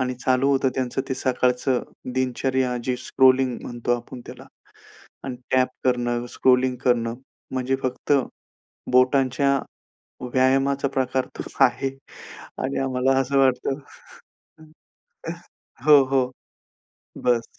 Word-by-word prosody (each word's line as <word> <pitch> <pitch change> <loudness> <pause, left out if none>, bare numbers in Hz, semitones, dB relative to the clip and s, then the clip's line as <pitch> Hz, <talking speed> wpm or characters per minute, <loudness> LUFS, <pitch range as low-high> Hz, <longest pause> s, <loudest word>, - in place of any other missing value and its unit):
आणि 125 0 -1
चालू 130 +2 +1
होतं 135 -1 +2
त्यांचं 130 0 -1
ते 130 - -1
सकाळचं 125 0 0 0.3
दिनचर्या 130 0 0
जी 125 -1 -1
स्क्रॉलिंग 130 -1 +4
म्हणतो 120 0 -2
आपण 120 +1 -10
त्याला. - - -11 0.8
आणि 130 -2 -4 0.2
टॅप 130 0 +4 0.2
करणं, 120 -1 0
स्क्रॉलिंग 130 0 +2
करणं 115 -2 +2 0.4
म्हणजे 130 0 0
फक्त 130 +3 0 0.8
बोटांच्या 135 +2 +3 0.7
व्यायामाचा 135 +1 +2
प्रकार 130 0 0
तर - - -5 0.2
आहे 135 - +1 0.7
आणि 135 +1 -2
आम्हाला 130 0 +1
असं 135 +1 0
वाटतं 135 +1 +2 2.1
हो. 145 -2 +8
हो. 130 -1 +1 1.0
बस. 120 -2 0
130 Hz, 105 wpm, -23 LUFS, 125-135 Hz, 2.1 s, हो